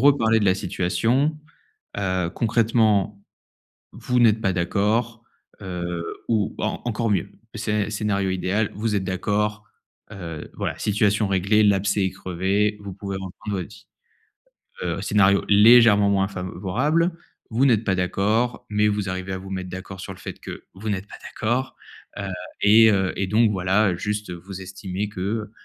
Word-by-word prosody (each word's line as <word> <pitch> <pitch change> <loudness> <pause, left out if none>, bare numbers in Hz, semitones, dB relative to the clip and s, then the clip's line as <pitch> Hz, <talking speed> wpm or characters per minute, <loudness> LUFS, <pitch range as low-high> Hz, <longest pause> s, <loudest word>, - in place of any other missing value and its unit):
reparlez 115 -5 +4
de - - +1
la 95 - +4
situation, 115 - 0 0.6
heu, 95 -3 -1
concrètement 110 -3 +2 0.7
vous 125 0 -1
n'êtes 110 -2 +4
pas 95 - +2
d'accord, 105 +6 0 0.4
heu 85 -2 -4 0.2
ou 110 -4 0
en - - -2
encore 115 -1 -1
mieux. 95 -5 0 0.2
Scé 105 -2 -1
scénario 105 -2 -1
idéal, 95 +3 0
vous 105 +1 -1
êtes 95 - -1
d'accord, 105 +3 -1 0.5
heu, 85 -6 -7
voilà - - -3
situation 105 0 +1
réglée, 100 +3 +3
l'abcès 100 0 +2
est - - -1
crevé, 95 +4 0
vous 100 -1 -7
pouvez 100 0 -5
reprendre 95 +2 -5
votre 90 - -5
vie. 105 +1 -16 1.0
Heu, - - -2
scénario 100 -1 +3
légèrement 105 -1 +7
moins 95 -1 +2
favorable, 120 - -1 0.4
vous 120 +5 +2
n'êtes 115 -5 +3
pas 95 - +2
d'accord, 105 +6 0
mais 105 0 +2
vous 105 -1 -2
arrivez 95 0 -4
à 95 - -3
vous 95 +1 -10
mettre 95 -1 -4
d'accord 95 +1 -8
sur 95 - -7
le 90 - -15
fait - - -8
que - - -9
vous 105 +4 -8
n'êtes 100 -1 -3
pas - - -11
d'accord, 125 +4 -2 0.4
heu, 100 0 -4 0.3
et 110 +2 +7
heu 95 -2 +1
et 100 - -1
donc 110 +2 +3
voilà 95 0 +2
juste 105 +2 -3
vous 95 +2 -9
estimez 95 +1 -5
que, 105 +2 -3
100 Hz, 155 wpm, -23 LUFS, 95-110 Hz, 1.0 s, légèrement